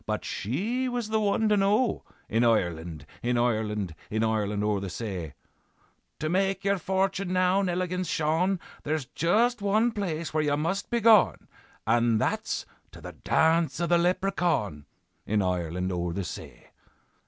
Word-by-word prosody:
but - - -2
she 220 - -2
was 240 -3 -3
the 220 0 +1
one 215 +1 +1
to 210 - +4
know, 210 +5 +2 0.2
In 115 +2 +1
Ireland, 85 -9 0 0.2
in 120 0 0
Ireland, 105 -6 0 0.2
In 110 +1 0
Ireland 105 -2 0
o'er 105 -1 +1
the 95 -1 -5
say. 90 -7 -5 0.8
'To 155 - -3
make 190 +3 0
your 200 0 +1
fortune 190 +1 -1
now, 185 +1 +3
Nelligan's 180 -1 -1
Shaun, 165 +5 +1 0.2
There's 155 -2 -2
just 225 - +1
one 215 +4 +2
place 170 -8 -3
where 155 - +2
you 145 -1 +1
must 180 +6 -2
be 235 -1 0
gaun, 220 -2 +5 0.4
And 115 0 +3
that's - - -1 0.3
to - - -11
the - - -8
dance 165 0 +1
of 170 - 0
the 175 -1 +4
Leprechaun, 175 - 0 0.4
In 105 -1 +1
Ireland 90 0 -1
o'er 85 -1 -2
the 100 - -2
say. - - -9
160 Hz, 155 wpm, -27 LUFS, -, 0.8 s, gaun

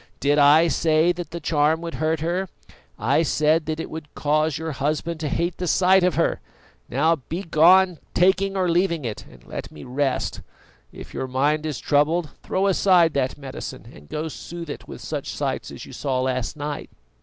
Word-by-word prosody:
Did 145 +2 +2
I 150 +4 +6
say 160 +1 +3
that 175 -1 -5
the 170 - -6
charm 155 0 +2
would 170 -1 -5
hurt 160 0 -1
her? 175 +3 -1 0.5
I 130 +8 +2
said 155 0 +2
that 155 0 -2
it - - -4
would 155 -2 -8
cause 155 +1 +1
your 160 0 -4
husband 155 +4 -2
to 155 -2 -2
hate 170 +3 -1
the 180 - -3
sight 185 +2 +4
of 180 -5 +2
her. 165 - +1 0.5
Now 160 +6 +2
begone, 170 +3 +3 0.2
taking 190 +2 +3
or 185 -1 +1
leaving 170 -3 +1
it, 110 -3 -5
and - - -17
let - - -6
me 75 - -11
rest. 135 +1 -1 0.5
If - - -11
your 130 - -3
mind 145 +4 +1
is 150 -4 -3
troubled, 150 +4 +1
throw 190 +1 -1
aside 185 -4 +4
that 130 -1 -1
medicine, 135 -2 -8
and 75 0 -16
go 155 +1 -3
soothe 165 0 -7
it - - -9
with - - -9
such - - -4
sights - - -3
as - - -9
you - - -12
saw 130 -2 -1
last 130 +1 -2
night." 145 0 -5
155 Hz, 190 wpm, -23 LUFS, 145-170 Hz, 0.5 s, I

